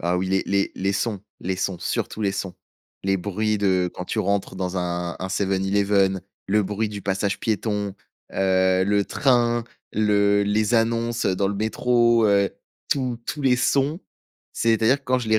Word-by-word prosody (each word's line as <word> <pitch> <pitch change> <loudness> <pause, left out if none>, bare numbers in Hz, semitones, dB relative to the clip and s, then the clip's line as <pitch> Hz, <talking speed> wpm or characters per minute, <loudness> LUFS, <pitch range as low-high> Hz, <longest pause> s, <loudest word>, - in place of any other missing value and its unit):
Ah, 85 +1 0
oui, 95 +1 -1
les 95 0 +2
les 100 0 +1
les 95 +1 -1
sons 100 0 -1 0.2
les 95 +1 -2
sons, 95 -1 -2
surtout 110 - -3
les 100 -1 +1
sons. 95 -2 -4 0.5
Les 95 0 +1
bruits 105 +3 -1
de 95 -3 +1
quand 90 - -6
tu - - -3
rentres 100 0 -1
dans 95 0 -3
un 85 -1 -3
un 95 - -4
Seven 95 0 0
Eleven, 100 -1 +2 0.3
le 105 +2 +2
bruit 105 +2 -2
du 100 -2 -7
passage 100 +1 -1
piéton, 105 -2 -1 0.4
heu, 95 -1 +2
le 100 0 +2
train, 120 -3 +2 0.3
le 100 -1 +3
les 105 +3 +1
annonces, 115 +1 +1
heu, 95 -1 +1
dans 100 0 +1
le 100 - -2
métro, 120 +2 +2
heu, 100 -1 +3 0.4
tous 125 -4 0
tous 150 - -4
les 125 -2 +4
sons. 140 +6 +1 0.5
C'est-à-dire 115 +3 +2
que 140 - -32
quand 130 0 +2
je 115 -3 -5
les 110 0 +4
100 Hz, 185 wpm, -23 LUFS, 95-115 Hz, 0.5 s, les